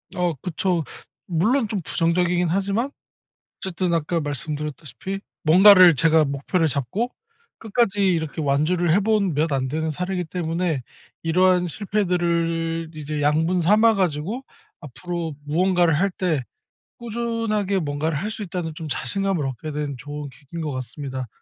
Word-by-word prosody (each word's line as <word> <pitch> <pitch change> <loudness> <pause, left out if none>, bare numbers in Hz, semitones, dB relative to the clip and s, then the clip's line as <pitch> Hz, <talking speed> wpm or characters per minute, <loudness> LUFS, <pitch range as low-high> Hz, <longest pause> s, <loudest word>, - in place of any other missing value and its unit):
어 175 -2 +1
그쵸. 180 -1 -1 0.4
물론 215 +9 +1
좀 200 -3 -3
부정적이긴 175 +2 +1
하지만 200 +8 0 0.7
어쨌든 180 -1 -2
아까 165 +1 0
말씀드렸다시피 150 +4 -4 0.2
뭔가를 185 0 +8
제가 160 +2 +4
목표를 140 +4 0
잡고 145 - -2 0.5
끝까지 210 -3 +1
이렇게 160 -1 -2
완주를 155 +4 +1
해 200 - +5
본 205 -4 +1
몇 155 +2 0
안 130 -1 0
되는 160 +2 -1
사례이기 180 +3 -2
때문에 165 -3 -2 0.4
이러한 180 +2 +3
실패들을 170 -4 -1
이제 150 0 -4
양분 160 +5 +2
삼아 215 +6 +5
가지고 185 - -1 0.4
앞으로 165 +2 -5
무언가를 175 0 +2
할 195 +3 +2
때 165 -8 -1 0.6
'꾸준하게 225 -4 -1
뭔가를 145 0 -1
할 210 - -2
수 220 -1 -5
있다.'는 170 -3 -4
좀 160 -1 -6
자신감을 185 +3 -1
얻게 135 +4 -5
된 145 -2 -3
좋은 145 +1 -7
계기인 150 +5 -9
것 150 -2 -3
같습니다. 130 0 -5
170 Hz, 315 characters per minute, -23 LUFS, 150-190 Hz, 0.7 s, 뭔가를